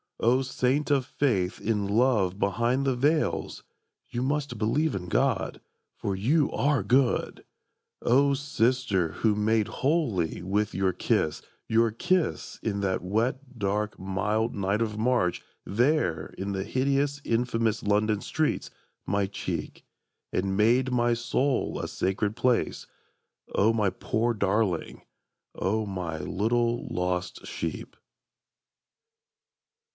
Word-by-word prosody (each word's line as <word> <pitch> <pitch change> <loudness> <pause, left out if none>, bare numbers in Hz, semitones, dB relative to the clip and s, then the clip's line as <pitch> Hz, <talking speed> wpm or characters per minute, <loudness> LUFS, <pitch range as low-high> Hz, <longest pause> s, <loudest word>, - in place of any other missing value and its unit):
O 125 +3 +3
saint 130 +3 0
of 135 -3 +3
faith 105 -10 0
in 105 -2 0
love 105 -4 +2
behind 120 +7 +1
the 135 -2 +2
veils, 150 +5 0 0.5
("You 120 - -3
must 145 -1 -1
believe 145 +9 +1
in 90 -2 -4
God, - - 0 0.3
for 100 - -2
you 140 +10 +2
are 140 -6 +1
good!"), 125 +4 +1 0.6
O 140 +3 +4
sister 125 - +1
who 105 +4 +1
made 105 0 +2
holy 125 - 0
with 100 +2 0
your 95 0 +1
kiss, 80 - 0 0.3
Your 115 0 +3
kiss 180 +10 -1
in 100 -3 -2
that 95 -2 0
wet 125 +7 -1
dark 105 +1 -1
mild 105 +4 -1
night 100 +2 0
of 105 -2 -1
March 110 -6 +1 0.2
There 105 - +1
in 100 +1 -3
the 95 -1 -2
hideous 140 +5 0
infamous 115 -2 0
London 105 0 +1
streets 155 -1 -1 0.4
My 100 0 +1
cheek, 100 0 -5 0.5
and 95 +1 -1
made 125 +5 +3
my 120 -1 +2
soul 125 +3 0
a - - -3
sacred 100 +3 -1
place, 125 0 +1 0.7
O 110 +3 +4
my 105 -3 +2
poor 115 +5 -1
darling, 100 -3 0 0.5
O 110 +3 0
my 90 -5 -4
little 120 +6 0
lost 90 0 -2
sheep! - - -5
110 Hz, 120 wpm, -27 LUFS, 100-130 Hz, 0.7 s, O